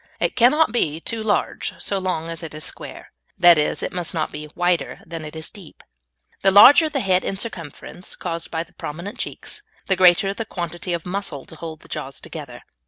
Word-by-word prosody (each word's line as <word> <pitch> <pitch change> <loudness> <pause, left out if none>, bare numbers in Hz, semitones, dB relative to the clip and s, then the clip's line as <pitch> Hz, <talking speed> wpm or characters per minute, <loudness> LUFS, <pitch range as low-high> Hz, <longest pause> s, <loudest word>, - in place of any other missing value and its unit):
It - - 0
cannot 290 +7 +5
be 160 -10 0
too 225 +6 -2
large 215 -1 -1
so 200 - -1
long 180 -4 -2
as 165 0 -5
it 160 -2 -7
is 155 - -4
square; - - -5 0.3
that 175 -3 +7
is, 150 - 0
it - - -3
must 175 -1 -2
not 155 -1 -1
be 150 0 -7
wider 175 -1 0
than 165 -1 -7
it 155 +1 -8
is 160 -1 -4
deep. 190 -6 -14 0.6
The 195 - +5
larger 275 - +8
the 280 -3 -1
head 185 -3 +2
in 195 - -3
circumference, 180 - -5
caused 170 -2 -4
by 165 0 -2
the 170 - -24
prominent 170 +7 -7
cheeks, - - -4 0.2
the 190 - +2
greater 185 +2 +5
the 225 - -4
quantity 175 -3 -4
of 170 -2 -3
muscle 180 -7 -4
to - - -12
hold 160 -1 -8
the - - -16
jaws - - -5
together. - - -9
175 Hz, 205 wpm, -22 LUFS, 165-200 Hz, 0.6 s, larger